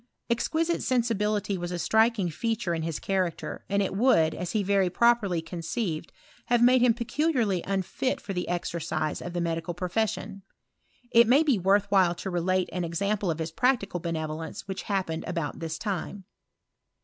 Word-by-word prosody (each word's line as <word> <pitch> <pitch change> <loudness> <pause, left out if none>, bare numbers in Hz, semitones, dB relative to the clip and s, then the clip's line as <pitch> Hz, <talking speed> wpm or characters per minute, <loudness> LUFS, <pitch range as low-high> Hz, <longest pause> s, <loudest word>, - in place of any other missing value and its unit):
Exquisite 320 +8 0
sensibility 210 -5 0
was 175 0 -4
a 175 - -2
striking 220 +1 +2
feature 225 0 -1
in 165 - -2
his 160 -1 -2
character, 185 -3 -2
and 200 0 +2
it 190 - -3
would, 195 -8 +4
as 175 0 -4
he 215 -2 +1
very 195 -1 +2
properly 200 -5 +2
conceived, 170 0 -4 0.4
have 240 0 +3
made 250 +1 +6
him 240 -2 +4
peculiarly 240 - 0
unfit 195 +6 -1
for 195 - -6
the 180 -1 -3
exercise 160 -3 -2
of 175 - -6
the 175 - -1
me 170 -1 0
dical 165 +1 -5
profession. 195 +1 -2 0.7
It 235 0 +6
may 270 +6 +5
be 275 -9 +2
worth 195 +2 +3
while 185 -3 +4
to 190 - -5
relate 180 +1 0
an 180 - -2
example 200 +4 -1
of 160 - -1
his 160 0 -4
practical 200 -3 +1
benevolence 160 -1 -4
which 190 -1 -4
hap 195 -2 +1
pened 160 0 -4
about 170 -4 -3
this 165 -1 -4
time. 200 0 -4
190 Hz, 175 wpm, -27 LUFS, 170-225 Hz, 0.7 s, made